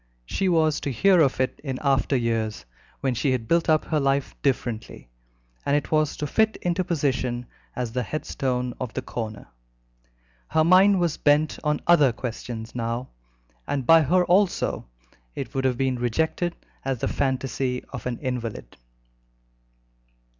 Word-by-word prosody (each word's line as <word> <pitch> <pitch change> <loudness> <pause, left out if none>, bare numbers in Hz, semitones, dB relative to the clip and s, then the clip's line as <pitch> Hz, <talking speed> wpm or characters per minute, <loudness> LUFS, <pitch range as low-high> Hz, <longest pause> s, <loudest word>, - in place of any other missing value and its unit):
She 190 - 0
was 160 -3 +2
to 140 - -3
hear 185 - +4
of 135 -4 +2
it 130 - -1
in 135 -3 -3
after 135 0 +2
years, 115 -3 -1 0.4
when 135 -2 +1
she 130 +3 +1
had 115 -3 -3
built 170 +3 +2
up 155 -1 +3
her 155 - 0
life 140 0 0
differently, 120 - -2 0.5
and 140 - +1
it 145 - -4
was 155 -1 +1
to 150 - -2
fit 220 +8 +2
into 180 +1 +1
position 130 -7 -1 0.3
as 125 -2 -3
the 125 +2 -1
headstone 125 -1 -2
of 125 -3 -5
the 130 - -2
corner. 110 - -6 1.0
Her 155 - +2
mind 185 +3 +6
was 170 -3 0
bent 150 +1 +2
on 150 -1 0
other 150 -7 +5
questions 115 -1 -6
now, 120 +1 -3 0.6
and 135 -3 -2
by 165 +4 +7
her 180 +5 +3
also 185 - +1 0.5
it - - -5
would 135 0 -1
have 125 -2 +1
been 130 -1 0
rejected 160 +8 0 0.3
as 135 -1 -1
the - - -2
fantasy 130 -1 -1
of 125 -2 -5
an 120 -2 -3
invalid. 120 - -4
135 Hz, 155 wpm, -25 LUFS, 125-155 Hz, 1.0 s, by